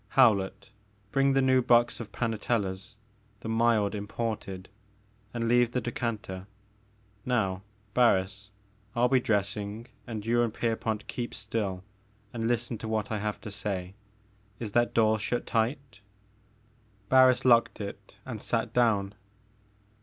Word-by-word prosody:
Howlett, 105 -6 +3 0.4
bring 135 0 +3
the 135 0 +3
new 130 0 +4
box 120 -1 +3
of 115 -3 -7
Panatella's, 105 -4 -2 0.2
— 105 -1 -36
the - - -6
mild 115 -2 +2
imported; 105 -2 -4 0.3
— 105 +1 -25
^and 115 - -1
leave 120 0 +3
the 125 - +1
decanter. 110 -6 -4 0.8
Now 95 -7 0 0.3
Barris, 100 -4 +2 0.5
I 120 +1 +3
41 - - +3
be - - +6
dressing, 105 0 -1 0.2
and 110 -3 -5
you 120 +1 +3
and 120 -2 +1
Pierpont 110 -1 -2
keep 120 -1 -5
still 100 -4 -3 0.5
and 115 -1 -2
listen 120 -1 -1
to 110 - -5
what 110 -1 -1
I 110 - -1
have 105 0 -3
to 105 - -7
say. 95 -3 -3 0.7
Is 110 -3 -4
that 120 +2 +2
door 110 -1 +4
shut 120 +3 -2
tight? 115 -1 -1 0.5
" 110 -2 -35
Barris 130 -1 +5
locked 120 -2 +4
it 100 -1 -8
and - - -6
sat - - -1
down. 105 -5 +2
110 Hz, 145 wpm, -29 LUFS, 105-120 Hz, 0.8 s, be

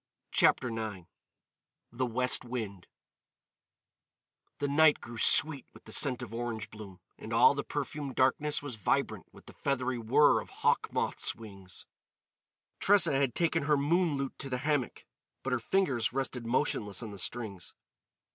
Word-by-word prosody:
CHAPTER 125 - +3
IX 110 -6 -5 0.9
THE 130 - -1
WEST 125 +2 +2
WIND 110 -7 -6 1.7
The 145 - -1
night 155 +1 +5
grew 120 -1 -9
sweet 145 +1 +3
with - - -15
the - - -11
scent 130 -3 +3
of 115 -2 -9
orange 115 -2 -4
bloom, 100 -4 -11 0.2
and - - -8
all - - +6
the - - -3
perfumed 145 -3 -4
darkness 145 +3 +1
was 135 -6 -6
vibrant 100 - -1
with - - -17
the - - -12
feathery 130 -3 -1
whirr 120 +6 +4
of - - -12 0.2
hawk - - +2
moths' - - -1
wings. 100 -5 -10 0.9
Tressa 195 -5 +4
had 135 -3 +1
taken 165 -3 +1
her 150 0 +3
moon 160 +3 +2
lute 135 -1 -4
to 135 - -4
the 125 - -1
hammock, 145 -5 -1 0.4
but 135 - -1
her 125 - +1
fingers 130 - 0
rested 125 -2 -3
motionless 115 -5 -1
on 110 - -6
the 100 - -8
strings. 100 -5 -5
125 Hz, 155 wpm, -30 LUFS, 110-145 Hz, 1.7 s, all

